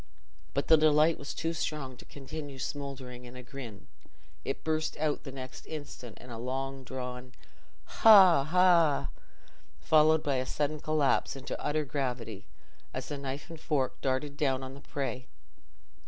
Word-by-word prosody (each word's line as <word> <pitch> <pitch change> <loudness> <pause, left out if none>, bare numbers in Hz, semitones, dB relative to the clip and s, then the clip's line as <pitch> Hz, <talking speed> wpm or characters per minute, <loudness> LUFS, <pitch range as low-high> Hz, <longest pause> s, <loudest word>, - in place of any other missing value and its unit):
But 140 - 0
the 160 - +7
delight 155 +1 +4
was 140 - -5
too 165 0 -1
strong 150 -5 -3
to - - -13
continue 145 0 -8
smouldering 130 -3 -6
in 120 +1 -11
a 125 - -8
grin—it 125 +1 -9
burst 155 0 -1
out 150 -1 0
the 135 - -6
next 130 -1 -9
instant 145 -7 -8
in 125 - -12
a 115 - -6
long 135 +2 -3
drawn 125 0 -6 0.5
"haw, 190 -9 +7
haw!" 170 -2 +4 0.7
followed 155 - +4
by 140 -2 +1
a 130 - -1
sudden 150 +1 -1
collapse 150 -2 +1
into 135 0 -6
utter 150 +1 0
gravity, 125 -7 -3 0.5
as - - -4
the 145 - -3
knife 140 +1 -5
and 165 - -8
fork 135 -5 -1
darted 140 +2 -1
down 135 -3 +1
on 130 0 -7
the 140 - -12
prey. 130 -2 -4
140 Hz, 155 wpm, -30 LUFS, 130-155 Hz, 0.7 s, the